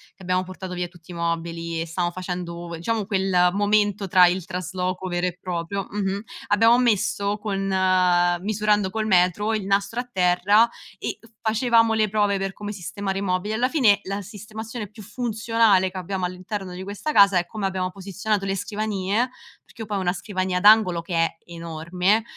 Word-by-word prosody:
che 190 Hz, -, -15 dB
abbiamo 185 Hz, +1 st, +1 dB
portato 185 Hz, 0 st, -7 dB
via 180 Hz, 0 st, -2 dB
tutti 175 Hz, 0 st, -16 dB
i -, -, -7 dB
mobili 170 Hz, 0 st, -3 dB
e -, -, -2 dB
stavamo 175 Hz, +1 st, -2 dB
facendo 175 Hz, -2 st, -5 dB
diciamo 215 Hz, +4 st, -1 dB
quel 190 Hz, -3 st, +2 dB
momento 205 Hz, 0 st, +1 dB
tra 180 Hz, 0 st, +6 dB
il 180 Hz, 0 st, -1 dB
trasloco 185 Hz, 0 st, -3 dB
vero 175 Hz, +1 st, -1 dB
e 180 Hz, 0 st, -5 dB
proprio 180 Hz, +2 st, -3 dB
mh-mh, 200 Hz, -1 st, -2 dB, 0.3 s
abbiamo 225 Hz, +3 st, +5 dB
messo 205 Hz, -3 st, +1 dB
con 200 Hz, -2 st, -3 dB, 0.8 s
misurando 210 Hz, 0 st, +1 dB
col 220 Hz, +1 st, -2 dB
metro, 190 Hz, +3 st, +2 dB
il 210 Hz, -3 st, -2 dB
nastro 200 Hz, +4 st, 0 dB
a 250 Hz, -, -4 dB
terra, 190 Hz, +4 st, +3 dB, 0.3 s
e -, -, -4 dB, 0.2 s
facevamo 230 Hz, 0 st, +3 dB
le 215 Hz, -1 st, +2 dB
prove 205 Hz, -1 st, +1 dB
per 195 Hz, 0 st, -3 dB
come 205 Hz, 0 st, -6 dB
sistemare 195 Hz, 0 st, -4 dB
i -, -, -2 dB
mobili. 190 Hz, +2 st, -1 dB
Alla 245 Hz, +3 st, +2 dB
fine, 245 Hz, -9 st, +4 dB
la 200 Hz, +1 st, -4 dB
sistemazione 215 Hz, +2 st, -7 dB
più 215 Hz, -1 st, -12 dB
funzionale 220 Hz, -3 st, +1 dB
che 190 Hz, -, -8 dB
abbiamo 185 Hz, +1 st, -4 dB
all'interno 185 Hz, +1 st, -4 dB
di 185 Hz, +1 st, -6 dB
questa 205 Hz, +10 st, -4 dB
casa 200 Hz, -5 st, +6 dB
è 175 Hz, -, +1 dB
come 210 Hz, +1 st, -5 dB
abbiamo 185 Hz, -1 st, -1 dB
posizionato 195 Hz, +1 st, -2 dB
le 195 Hz, 0 st, -1 dB
scrivanie, 210 Hz, +3 st, -1 dB, 0.4 s
perché 225 Hz, -, -13 dB
io 215 Hz, -, -5 dB
poi 210 Hz, -, -3 dB
ho -, -, 0 dB
1 180 Hz, -1 st, 0 dB
scrivania 185 Hz, -2 st, -2 dB
ad 200 Hz, -, -5 dB
angolo 210 Hz, -6 st, +6 dB
che 170 Hz, 0 st, -5 dB
è 165 Hz, 0 st, +1 dB
enorme, 170 Hz, +5 st, -1 dB
195 Hz, 180 wpm, -24 LUFS, 180-210 Hz, 0.8 s, tra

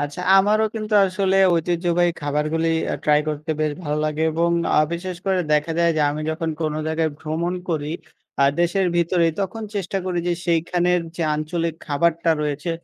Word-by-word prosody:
আচ্ছা, 145 Hz, +4 st, -4 dB, 0.2 s
আমারও 210 Hz, +3 st, +4 dB
কিন্তু 215 Hz, -1 st, -3 dB
আসলে 190 Hz, 0 st, 0 dB, 0.2 s
ঐতিহ্যবাহী 175 Hz, +1 st, +1 dB
খাবারগুলি 150 Hz, +3 st, 0 dB, 0.2 s
আ -, -, 0 dB
ট্রাই 150 Hz, 0 st, +4 dB
করতে 155 Hz, +1 st, -4 dB
বেশ 155 Hz, -1 st, +1 dB
ভালো 150 Hz, -2 st, -2 dB
লাগে 155 Hz, +1 st, -1 dB
এবং 170 Hz, +2 st, +1 dB, 0.3 s
আ -, -, +6 dB
বিশেষ 180 Hz, +1 st, -4 dB
করে 190 Hz, -1 st, +2 dB
দেখা 150 Hz, +2 st, +1 dB
যায় 170 Hz, 0 st, +4 dB
যে, -, -, +2 dB
আমি 150 Hz, -, -4 dB
যখন 165 Hz, 0 st, -2 dB
কোন 155 Hz, -1 st, -1 dB
জায়গায় 160 Hz, 0 st, 0 dB
ভ্রমণ 165 Hz, +3 st, -2 dB
করি, 150 Hz, -2 st, -2 dB, 0.5 s
আ -, -, +6 dB, 0.2 s
দেশের 180 Hz, +2 st, +2 dB
ভিতরে 170 Hz, 0 st, +2 dB
তখন 210 Hz, +4 st, -3 dB
চেষ্টা 195 Hz, 0 st, -2 dB
করি 180 Hz, -1 st, -1 dB
যে -, -, +2 dB
সেইখানের 175 Hz, +1 st, +1 dB, 0.2 s
যে 170 Hz, -, -2 dB
আঞ্চলিক 165 Hz, +1 st, -2 dB
খাবারটা 165 Hz, +3 st, +1 dB
রয়েছে 150 Hz, +3 st, -2 dB
170 Hz, 175 wpm, -22 LUFS, 155-180 Hz, 0.5 s, আ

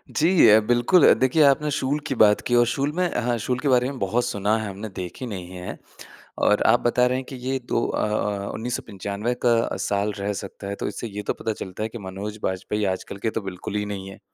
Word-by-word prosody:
जी 165 Hz, -3 st, +5 dB
अ, 110 Hz, +1 st, +8 dB
बिल्कुल। 120 Hz, +9 st, +5 dB
देखिए, 130 Hz, +5 st, +3 dB
आपने 145 Hz, +2 st, +4 dB
शूल 145 Hz, +2 st, 0 dB
की 135 Hz, -, -2 dB
बात 105 Hz, -2 st, +5 dB
की 120 Hz, -, +2 dB
और 120 Hz, 0 st, +5 dB
शूल 140 Hz, +4 st, 0 dB
मैं 180 Hz, -1 st, +1 dB
हाँ, 120 Hz, 0 st, 0 dB
शूल 125 Hz, +3 st, -2 dB
के 145 Hz, -, -2 dB
बारे 125 Hz, 0 st, +3 dB
में 140 Hz, -, -6 dB
बहुत 115 Hz, +6 st, 0 dB
सुना 105 Hz, -2 st, 0 dB
है 110 Hz, -2 st, -4 dB
हमने, 100 Hz, +3 st, -7 dB
देखी 95 Hz, +5 st, -6 dB
नहीं 95 Hz, -5 st, -6 dB
है। 90 Hz, 0 st, -7 dB, 0.7 s
और 105 Hz, -, +4 dB
आप 120 Hz, -, +5 dB
बता 125 Hz, +1 st, +3 dB
रहे 125 Hz, +1 st, 0 dB
हैं 130 Hz, -, -5 dB
कि 135 Hz, -, -7 dB
ये 130 Hz, +1 st, -2 dB
दो 115 Hz, -, +1 dB
अ -, -, -1 dB
अ, 105 Hz, -1 st, -2 dB
1995 105 Hz, -1 st, -3 dB
का 115 Hz, -1 st, +2 dB
साल 100 Hz, +1 st, 0 dB
रह 100 Hz, +1 st, -1 dB
सकता 100 Hz, 0 st, -7 dB
है, 100 Hz, -, -3 dB
तो -, -, -4 dB
इससे 105 Hz, +3 st, -5 dB
ये 105 Hz, -1 st, -6 dB
तो -, -, +1 dB
पता 110 Hz, -, -3 dB
चलता 95 Hz, +1 st, -6 dB
है 110 Hz, -, -2 dB
कि 120 Hz, -, -8 dB
मनोज 100 Hz, +3 st, -6 dB
बाजपेयी 105 Hz, +3 st, -1 dB
आजकल 95 Hz, -, -7 dB
के 115 Hz, -, +2 dB
तो -, -, -9 dB
बिल्कुल 95 Hz, +1 st, -6 dB
ही 105 Hz, 0 st, 0 dB
नहीं 95 Hz, -2 st, -5 dB
है। 95 Hz, -, -12 dB
110 Hz, 240 wpm, -24 LUFS, 100-125 Hz, 0.7 s, अ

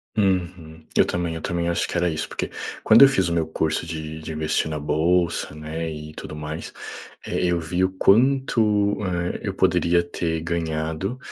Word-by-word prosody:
Uhum, 90 Hz, -5 st, -1 dB
eu -, -, +5 dB
também 85 Hz, -2 st, -2 dB
eu 80 Hz, -, -6 dB
também 85 Hz, -1 st, -2 dB
acho 85 Hz, -, 0 dB
que -, -, -3 dB
era 90 Hz, 0 st, +2 dB
isso 80 Hz, -2 st, -2 dB
porque, -, -, -4 dB, 0.3 s
quando 110 Hz, +4 st, +7 dB
eu -, -, +10 dB
fiz 95 Hz, -9 st, +1 dB
o -, -, -1 dB
meu 80 Hz, -2 st, 0 dB
curso 80 Hz, 0 st, -1 dB
de 80 Hz, -1 st, -6 dB
de 80 Hz, -, -7 dB
investir 80 Hz, 0 st, 0 dB
na 75 Hz, -, -3 dB
bolsa, 80 Hz, +2 st, +1 dB
né, 80 Hz, +2 st, -4 dB
e 75 Hz, 0 st, -8 dB
tudo 75 Hz, -, -8 dB
mais, 75 Hz, +2 st, -6 dB, 0.5 s
eh, -, -, -2 dB
eu 85 Hz, -1 st, +1 dB
vi 90 Hz, +3 st, -1 dB
o 95 Hz, -, +2 dB
quanto, 105 Hz, -1 st, +3 dB
eh, 90 Hz, -1 st, -2 dB
eu -, -, -4 dB
poderia 85 Hz, 0 st, +3 dB
ter 85 Hz, -1 st, -2 dB
ganhado 80 Hz, +5 st, -2 dB
85 Hz, 185 wpm, -23 LUFS, 80-90 Hz, 0.5 s, eu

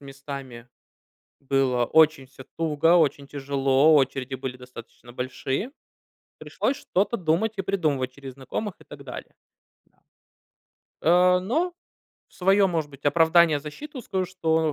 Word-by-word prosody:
местами 135 Hz, -3 st, -9 dB, 0.7 s
было 130 Hz, -3 st, +1 dB
очень 155 Hz, -1 st, +3 dB
всё 135 Hz, 0 st, -14 dB
туго, 165 Hz, +1 st, +3 dB
очень 145 Hz, -3 st, +1 dB
тяжело, 140 Hz, +1 st, +2 dB
очереди 135 Hz, -2 st, 0 dB
были 130 Hz, -1 st, -6 dB
достаточно 125 Hz, -1 st, -13 dB
большие, 130 Hz, -, -3 dB, 0.7 s
пришлось 270 Hz, -, -2 dB
что-то 210 Hz, -4 st, -1 dB
думать 180 Hz, +4 st, 0 dB
и -, -, 0 dB
придумывать 150 Hz, -10 st, -1 dB
через 135 Hz, -1 st, -10 dB
знакомых 160 Hz, -, -5 dB
и -, -, -16 dB
так -, -, -12 dB
далее. -, -, -9 dB, 0.5 s
Да. -, -, -38 dB, 1.0 s
Э, 180 Hz, +2 st, +5 dB
но 310 Hz, -, -1 dB, 0.6 s
в -, -, -27 dB
своё, 195 Hz, +2 st, +3 dB
может 160 Hz, -4 st, -2 dB
быть, 140 Hz, -1 st, -16 dB
оправдание, 160 Hz, 0 st, +4 dB
защиту 265 Hz, -, -9 dB
скажу, 190 Hz, -5 st, -2 dB
что 160 Hz, -4 st, 0 dB
150 Hz, 130 wpm, -25 LUFS, 135-180 Hz, 1.0 s, Э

